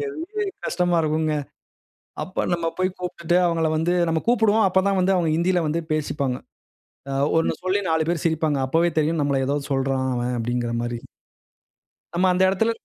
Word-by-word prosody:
பெரிய 420 0 -4 0.2
கஷ்டமா 175 -1 +1
இருக்குங்க. 155 0 0 0.9
அப்ப 185 - -3
நம்ம 170 -1 -1
போயி 185 0 +1
கூப்ட்டுட்டு 175 -1 -1
அவங்கள 165 -1 +1
வந்து 165 +3 +1 0.2
நம்ம 160 - +1
கூப்டுவோம். 220 -2 +4
"அப்ப 190 0 +3
தான் 195 -1 +2
வந்து 190 +1 +3
அவங்க 170 -3 +1
ஹிந்தியில 175 +1 +2
வந்து 165 +3 -1
பேசிப்பாங்க. 140 -4 -1 1.0
ஒண்ணு 165 - +1
சொல்லி 185 +2 +1
4 160 -1 +1
பேரு 170 -2 -1
சிரிப்பாங்க." 160 -3 +1
அப்பவே 165 +5 +2
தெரியும் 155 +1 0
நம்மள 140 -1 +1
ஏதோ 140 - 0
சொல்றான் 135 -1 0
அவன் 120 0 -1
அப்டின்கிற 120 0 -2
மாரி 120 0 -3 1.2
நம்ம 185 +2 +3
அந்த 180 +1 +1
எடத்துல 225 +4 +1
165 Hz, 160 wpm, -23 LUFS, 145-185 Hz, 1.2 s, கூப்டுவோம்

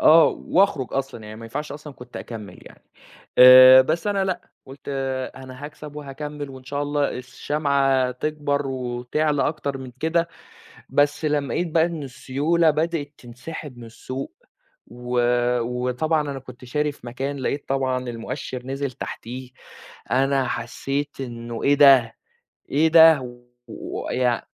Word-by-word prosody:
آه، 160 +1 +7
وأخرُج 185 -8 +1
أصلًا 135 -4 -3
يعني 105 0 -9
ما 115 - -10
ينفعش 145 +7 -5
أصلًا 150 0 -9
كنت 125 -1 -12
أكمّل 105 -6 -8
يعني، - - -16 0.5
آآ 130 +1 +10
بس 160 +7 -2
أنا 200 -1 +1
لأ 185 -1 -4 0.2
قُلت 135 +1 -12 0.6
أنا 130 +1 -10
هاكسب 150 0 -9
وهاكمّل 145 0 -6
وإن 130 -1 -12
شاء 140 +2 -3
الله 145 0 0
الشمعة 135 0 0
تكبر 145 +1 -2
وتعلى 130 +3 -1
أكتر 140 -3 -4
من 130 -2 -9
كده، 165 +1 +1 0.6
بس 145 +2 +1
لمّا 145 -4 0
لقيت 175 - -1
بقى 165 +1 +3
إن 165 -3 -5
السيولة 145 +5 +1
بدأت 155 -1 -2
تنسحب 125 +3 -9
من 120 - -9
السوق، 130 +4 -7 0.5
و 125 +1 -3 0.4
وطبعًا 125 +6 0
أنا 135 - -5
كنت 130 -1 -13
شاري 150 +4 -1
في 125 - -15
مكان 135 +4 -4
لقيت 140 +2 -3
طبعًا 130 -2 -1
المؤشِّر 125 +2 -6
نزل 135 +1 -3
تحتيه، 125 +2 -7 0.6
أنا 135 +1 +2
حسّيت 135 +5 -3
إنه 120 -2 -6
إيه 140 - +4
ده! 135 -5 +6 0.5
إيه 155 +3 +3
ده! 155 -7 +6 0.3
ويع 125 -1 -2
135 Hz, 140 wpm, -23 LUFS, 125-150 Hz, 0.6 s, آآ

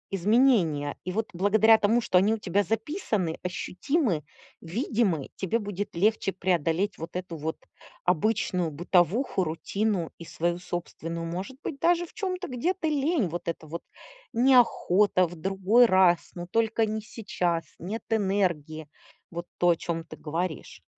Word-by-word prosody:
изменения, 190 - +3
и 185 - -2
вот 220 +3 -2
благодаря 220 +4 +5
тому, 220 +4 +3
что 200 -6 +3
они 215 +4 +3
у - - -6
тебя 200 0 +1
записаны, 220 - -2
ощутимы, 180 - -1 0.4
видимы,- 190 - -1
тебе 195 +4 0
будет 205 -3 -5
легче 205 +1 +2
преодолеть 180 +1 0
вот 165 +2 -7
эту 180 -2 -4
вот 160 +1 -4 0.5
обычную 180 -2 +1
бытовуху, 180 - +1
рутину 180 +2 -1
и 170 - -9
свою 170 +1 -2
собственную, 170 -1 -5
может 185 +10 -5
быть, 275 - -5
даже 345 +1 +3
в - - -18
чём-то 370 -3 -3
где-то 320 +7 -1
лень. 295 - +1
Вот 170 +1 -6
это 165 -1 -4
вот 165 +2 -6 0.5
"неохота", 225 -7 +4
"в 175 - -10
другой 195 +7 +3
раз", 185 -4 +5 0.2
"но 175 0 -5
только 225 +3 +1
не 215 0 -3
сейчас", 180 -6 -2
"нет 205 +7 -5
энергии". 175 -7 0 0.4
Вот 170 +1 -6
то, 175 - +3
о 170 - +5
чём 165 0 -4
ты - - -11
говоришь. 165 +2 -4
190 Hz, 145 wpm, -27 LUFS, 170-225 Hz, 0.5 s, благодаря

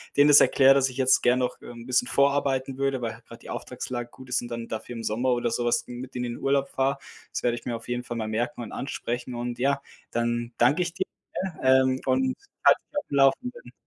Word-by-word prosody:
denen 145 +1 +6
das 145 - +9
erkläre, 135 0 +6
dass 135 -1 +2
ich 130 - -10
jetzt 130 0 +4
gern 125 +1 +4
noch, 125 - -2
ähm, 120 -1 -10
'n - - -11
bisschen 125 -1 +1
vorarbeiten 140 -1 +1
würde, 135 -1 0
weil 115 -1 -2
halt 115 +1 -16
grad 115 0 -12
die - - -11
Auftragslage 120 -1 -5
gut 130 +1 -14
ist 125 - +1
und 120 - -7
dann 115 -1 -5
dafür 110 +2 -5
im 115 - -6
Sommer 125 +4 +1
oder 120 -1 0
so 120 +1 -1
was 120 - +2
mit 125 +1 -8
denen 125 0 -2
in 120 - -4
Urlaub 140 0 +1
fahre. 135 +1 0 0.3
Das - - -4
werde 120 -1 +2
ich - - -11
mir 120 -2 -2
auf 115 +1 -9
jeden 120 0 -2
Fall 120 - -5
mal 110 -1 -2
merken 120 +4 -2
und 110 - -8
ansprechen. 125 -2 -4
Und 120 0 -4
ja, 140 +1 +1 0.3
dann 120 0 -1
danke 140 +9 +4
ich 175 -1 -2
dir, - - -2 0.6
ähm, 130 0 +4
und 260 0 +2 0.3
halt - - +7
mich 290 - -1
auf - - -13
dem 140 - -3 0.4
Laufenden. 120 - -13
125 Hz, 245 wpm, -26 LUFS, 120-135 Hz, 0.6 s, das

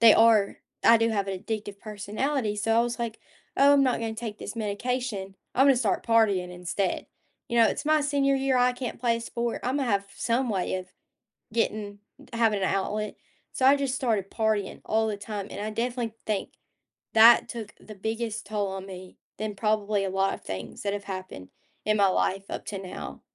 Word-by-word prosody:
they 230 -2 +9
are 225 -3 +4 0.3
I 230 - +8
do 230 0 +2
have 200 -2 0
an 190 - -2
addictive 205 -1 -5
personality. 215 +3 -2
So, 225 +2 +1
I - - +6
was 240 0 -3
like, 230 -2 -3 0.4
"Oh, 280 +1 +6
I'm 280 -1 +5
not 255 -2 +2
gonna 225 -1 -2
take 220 -2 -6
this - - -6
medication. 210 -2 -3 0.2
I'm 265 +3 +5
gonna 270 -2 +6
start 235 -2 0
partying 205 -6 +3
instead." 180 +1 -2 0.4
You 235 - -2
know, 225 - +7
"It's - - -2
my 310 0 +4
senior 280 -1 +2
year. 270 -1 +1
I 250 0 +4
can't 245 -2 -5
play 235 -2 +2
a - - -5
sport. 235 0 -3
Imma 265 +2 0
have 200 -4 0
some 240 +2 0
way 190 -3 -1
of 185 0 -4 0.7
getting 210 -3 -1 0.3
having 225 -3 +2
an - - +2
outlet." 210 +2 -1 0.4
So, 260 - +1
I 275 - +8
just 275 -2 -1
started 220 -7 0
partying 215 -3 -1
all 220 0 +1
the 210 -2 -2
time, 205 -1 -5
and - - -5
I 215 - -2
definitely 235 0 -2
think 210 -3 -2 0.6
that 225 +2 +7
took 220 -3 -6
the 215 - -11
biggest 225 +2 -3
toll 205 -1 -1
on 190 0 -5
me 185 -1 -10 0.2
than 210 -1 -4
probably 210 -1 +1
a 195 - -1
lot 195 +1 +1
of - - -8
things 95 - -7
that 200 0 -1
have 205 0 -5
happened 185 - -7 0.4
in 215 0 +3
my 200 -1 +5
life 195 +1 0
up - - -5
to 200 - -4
now. 75 - -7
215 Hz, 200 wpm, -27 LUFS, 200-235 Hz, 0.7 s, they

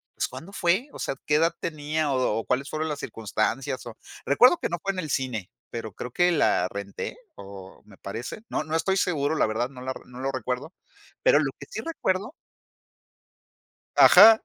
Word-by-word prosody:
pues, - - 0
¿cuándo 160 +10 -10
fue? 190 +10 +1
O - - -10
sea, - - -2
¿qué 150 - +2
edad 165 +2 +3
tenía 155 -1 -1
o 130 -4 +1
o - - -5
cuáles 135 +3 0
fueron 155 +1 -2
las 150 -2 -3
circunstancias? 115 +4 -2
O 115 - -9 0.3
recuerdo 250 - +6
que - - -2
no 175 - -2
fue 195 - 0
en 185 - -4
el 155 -4 -4
cine, 125 -9 -2 0.2
pero 115 -2 -5
creo 125 - -6
que 175 +4 +3
la 120 - +3
renté, 100 - -6 0.2
o 95 -1 -11
me 100 -2 -17
parece. 115 - -6
No - - -1
no 155 +1 -3
estoy 190 +4 +1
seguro, 155 -5 +1
la - - +3
verdad, 115 +3 -1
no 130 -2 -11
la 130 +1 -3
no 125 0 -11
lo 135 +1 -1
recuerdo, 130 +3 -3 0.5
pero - - +6
lo - - 0
que - - -8
sí - - -4
recuerdo 210 - -1 1.6
Ajá. 220 +4 +9
140 Hz, 195 wpm, -26 LUFS, 120-170 Hz, 1.6 s, Ajá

